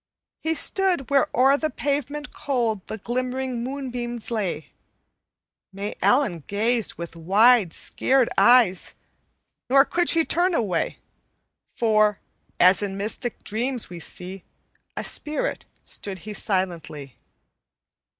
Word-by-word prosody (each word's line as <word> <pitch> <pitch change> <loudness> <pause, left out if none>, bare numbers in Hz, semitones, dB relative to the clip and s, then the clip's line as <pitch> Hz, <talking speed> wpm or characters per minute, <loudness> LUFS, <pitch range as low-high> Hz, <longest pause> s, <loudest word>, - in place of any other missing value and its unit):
"He 320 +1 -1
stood 355 -5 +2
where 275 -1 +4
o'er 270 +3 +5
the 310 +1 -1
pavement 290 +1 -3
cold 235 -7 -1
The 220 - -5
glimmering 250 +2 -3
moonbeams 245 -3 -5
lay. 185 -9 -3 1.0
May 200 +2 -5
Ellen 210 - +2
gazed 225 +2 0
with 170 0 -8
wide, 200 +4 +4
scared 260 +6 +1
eyes, 235 -7 +4 0.7
Nor 275 +2 +6
could 345 +2 0
she 325 -1 +4
turn 355 +1 +2
away, 190 - -1 0.8
For, 215 -3 +3 0.4
as 185 +3 +5
in 195 -1 -3
mystic 220 +4 -3
dreams 240 +1 -2
we 175 - -7
see 180 +3 -6 0.5
A - - -2
spirit, 300 -1 -2 0.2
stood 195 -2 -1
he 215 - -5
silently. 170 -9 -3
235 Hz, 115 wpm, -24 LUFS, 195-270 Hz, 1.0 s, Nor